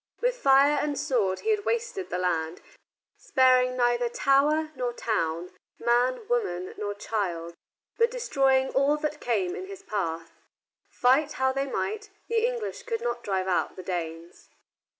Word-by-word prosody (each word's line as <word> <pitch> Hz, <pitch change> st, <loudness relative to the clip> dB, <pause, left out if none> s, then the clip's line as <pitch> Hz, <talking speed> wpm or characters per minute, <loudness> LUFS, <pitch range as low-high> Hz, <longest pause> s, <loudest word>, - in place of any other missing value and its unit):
With -, -, +1 dB
fire 280 Hz, -, +4 dB
and 290 Hz, -1 st, -2 dB
sword 240 Hz, -10 st, 0 dB
he 440 Hz, -, +1 dB
had 420 Hz, -1 st, 0 dB
wasted 465 Hz, -4 st, -2 dB
the -, -, -2 dB
land, 170 Hz, -2 st, -1 dB, 0.6 s
sparing 255 Hz, -1 st, +3 dB
neither 240 Hz, -1 st, +2 dB
tower 295 Hz, +5 st, +2 dB
nor 245 Hz, -2 st, -2 dB
town, 175 Hz, -7 st, -2 dB, 0.3 s
man, 250 Hz, -, +1 dB
woman, 300 Hz, -, -1 dB
nor 205 Hz, -1 st, -3 dB
child, 180 Hz, -6 st, -3 dB, 0.5 s
but 465 Hz, +1 st, +5 dB
destroying 270 Hz, -, +2 dB
all 280 Hz, +2 st, +3 dB
that 300 Hz, 0 st, -3 dB
came 200 Hz, -7 st, 0 dB
in 375 Hz, -, -6 dB
his 395 Hz, -1 st, -10 dB
path. 165 Hz, -5 st, -3 dB, 0.6 s
Fight 275 Hz, +4 st, +2 dB
how 265 Hz, 0 st, +1 dB
they 275 Hz, +1 st, -2 dB
might, 420 Hz, +9 st, -3 dB, 0.2 s
the 455 Hz, -1 st, +1 dB
English 485 Hz, -1 st, -4 dB
could 470 Hz, -2 st, -3 dB
not 240 Hz, 0 st, -2 dB
drive 190 Hz, -2 st, -1 dB
out 185 Hz, -, 0 dB
the 185 Hz, -, -8 dB
Danes. 170 Hz, -2 st, -6 dB
255 Hz, 150 wpm, -27 LUFS, 190-310 Hz, 0.6 s, but